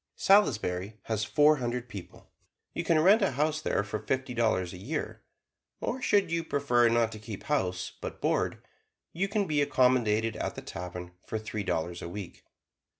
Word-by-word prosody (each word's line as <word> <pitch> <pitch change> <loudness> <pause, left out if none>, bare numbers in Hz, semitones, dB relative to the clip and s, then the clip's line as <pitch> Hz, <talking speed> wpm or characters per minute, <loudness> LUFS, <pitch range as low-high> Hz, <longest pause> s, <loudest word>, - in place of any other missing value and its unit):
Salisbury 110 - +2
has 110 -1 -1
four 150 +3 +5
hundred 125 -1 -3
people. 100 -7 -11 0.4
You - - -2
can 165 -2 +3
rent 200 +7 +6
a 195 -8 +2
house 155 +3 0
there 105 - 0
for 105 +1 -4
fifty 130 +1 -2
dollars 110 -7 +1
a 90 - -9
year, 145 - -4 0.6
or 255 +2 -3
should 200 -7 +2
you 165 0 0
prefer 125 -6 +3
not 115 -1 +2
to 110 - -8
keep 110 -2 -8
house, 90 -11 -1
but - - -6
board, - - 0 0.5
you 190 +4 0
can 200 0 0
be 150 -4 +1
accommodated 115 -5 +2
at - - -3
the - - -7
tavern 90 0 -7 0.2
for 110 - -2
three 110 -1 -4
dollars 85 -1 -2
a - - -5
week. 100 0 -8
120 Hz, 175 wpm, -29 LUFS, 105-150 Hz, 0.6 s, rent